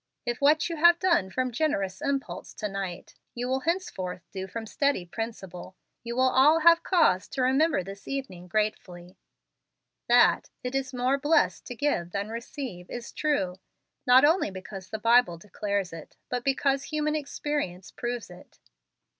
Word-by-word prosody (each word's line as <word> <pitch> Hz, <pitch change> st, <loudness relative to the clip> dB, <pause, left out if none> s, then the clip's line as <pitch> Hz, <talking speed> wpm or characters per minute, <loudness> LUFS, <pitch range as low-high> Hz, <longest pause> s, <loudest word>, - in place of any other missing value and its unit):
If 240 Hz, +2 st, -3 dB
what 300 Hz, +2 st, +4 dB
you 335 Hz, -2 st, -4 dB
have 340 Hz, +2 st, +6 dB
done 340 Hz, -, +2 dB
from 255 Hz, +5 st, -1 dB
generous 230 Hz, -7 st, -1 dB
impulse 280 Hz, -2 st, -3 dB
to 215 Hz, -, -3 dB
night 195 Hz, -3 st, -6 dB, 0.2 s
you 245 Hz, +1 st, -3 dB
will 260 Hz, +1 st, 0 dB
henceforth 260 Hz, -, -3 dB
do 190 Hz, -1 st, -5 dB
from 225 Hz, +4 st, -6 dB
steady 280 Hz, -4 st, 0 dB
principle, 190 Hz, -3 st, -7 dB, 0.3 s
you 235 Hz, 0 st, -5 dB
will 255 Hz, -, +3 dB
all 300 Hz, +5 st, +5 dB
have 335 Hz, +1 st, +6 dB
cause 325 Hz, -, +3 dB
to 260 Hz, -, -2 dB
remember 270 Hz, -, +2 dB
this 195 Hz, +2 st, -10 dB
evening 255 Hz, -11 st, -5 dB
gratefully. 180 Hz, -3 st, -3 dB, 0.9 s
That 240 Hz, 0 st, +4 dB
'it 250 Hz, +1 st, -3 dB
is 270 Hz, -1 st, -1 dB
more 255 Hz, +2 st, 0 dB
blessed 300 Hz, +4 st, +2 dB
to 245 Hz, -, -6 dB
give 225 Hz, -11 st, -1 dB
than 200 Hz, +1 st, -2 dB
receive' 230 Hz, -5 st, -7 dB
is 240 Hz, -1 st, -7 dB
true, 195 Hz, -12 st, -1 dB, 0.5 s
not 255 Hz, +3 st, +7 dB
only 320 Hz, -, +3 dB
because 190 Hz, 0 st, -9 dB
the 220 Hz, -, -4 dB
Bible 230 Hz, -5 st, +4 dB
declares 200 Hz, 0 st, -3 dB
it, 165 Hz, -2 st, -11 dB
but 245 Hz, -1 st, -2 dB
because 275 Hz, 0 st, +1 dB
human 305 Hz, -1 st, -1 dB
experience 285 Hz, -10 st, -3 dB
proves 240 Hz, -5 st, -5 dB
it." 175 Hz, -, -15 dB
245 Hz, 160 wpm, -27 LUFS, 190-280 Hz, 0.9 s, not